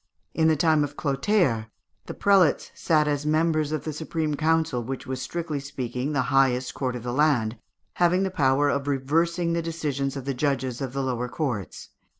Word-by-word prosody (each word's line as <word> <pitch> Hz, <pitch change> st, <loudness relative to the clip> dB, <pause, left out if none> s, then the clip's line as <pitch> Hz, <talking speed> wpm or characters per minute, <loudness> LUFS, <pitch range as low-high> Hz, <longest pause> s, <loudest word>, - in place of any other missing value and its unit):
In 160 Hz, -1 st, +2 dB
the 160 Hz, -, +4 dB
time 155 Hz, 0 st, +3 dB
of 145 Hz, 0 st, -5 dB
Clotaire, 135 Hz, -, +1 dB, 0.4 s
the -, -, -6 dB
prelates 195 Hz, -6 st, +3 dB
sat 155 Hz, -2 st, +2 dB
as 145 Hz, -1 st, 0 dB
members 155 Hz, 0 st, +1 dB
of 155 Hz, -, -2 dB
the 155 Hz, -, -4 dB
supreme 155 Hz, 0 st, -2 dB
council, 155 Hz, -4 st, +1 dB
which 130 Hz, +3 st, -5 dB
was 130 Hz, -1 st, -4 dB
strictly 160 Hz, +2 st, -3 dB
speaking 130 Hz, -1 st, -4 dB
the 145 Hz, -3 st, +1 dB
highest 130 Hz, -2 st, +2 dB
court 130 Hz, -2 st, -2 dB
of 120 Hz, -, -6 dB
the 120 Hz, 0 st, -3 dB
land, 125 Hz, -6 st, +2 dB, 0.3 s
having 180 Hz, +2 st, +2 dB
the 190 Hz, -, -1 dB
power 140 Hz, -3 st, +2 dB
of 140 Hz, 0 st, -1 dB
reversing 165 Hz, +5 st, +1 dB
the 170 Hz, -, 0 dB
decisions 145 Hz, -5 st, -3 dB
of 135 Hz, -, -6 dB
the 140 Hz, -, -1 dB
judges 130 Hz, -2 st, -1 dB
of 130 Hz, -2 st, -4 dB
the 135 Hz, 0 st, -1 dB
lower 125 Hz, -1 st, -2 dB
courts. 125 Hz, -, -4 dB
145 Hz, 185 wpm, -25 LUFS, 130-160 Hz, 0.4 s, the